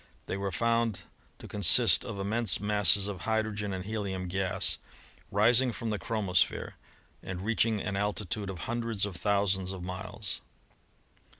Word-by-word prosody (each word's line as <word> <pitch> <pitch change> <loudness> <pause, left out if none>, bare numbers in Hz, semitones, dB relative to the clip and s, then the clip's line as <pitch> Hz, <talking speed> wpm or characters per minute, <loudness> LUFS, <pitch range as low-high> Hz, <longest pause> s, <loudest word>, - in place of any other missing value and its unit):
They - - -3
were 100 0 -3
found 115 -3 0 0.3
to - - -11
consist 105 +1 +5
of 115 -4 -6
immense 105 0 +1
masses 105 -1 +4
of 100 -3 -6
hydrogen 110 -2 -1
and 95 -1 -5
helium 100 -4 -3
gas 95 +1 0 0.5
rising 120 +5 +4
from 115 -1 -4
the 105 - -2
chromosphere 100 -3 0 0.5
and 95 -1 -6
reaching 110 0 +1
an 100 0 -3
altitude 105 0 -1
of 90 -3 -6
hundreds 115 -3 -2
of 100 -3 -6
thousands 95 -1 0
of 95 -2 -7
miles. 90 +1 -6
100 Hz, 140 wpm, -29 LUFS, 95-110 Hz, 0.5 s, consist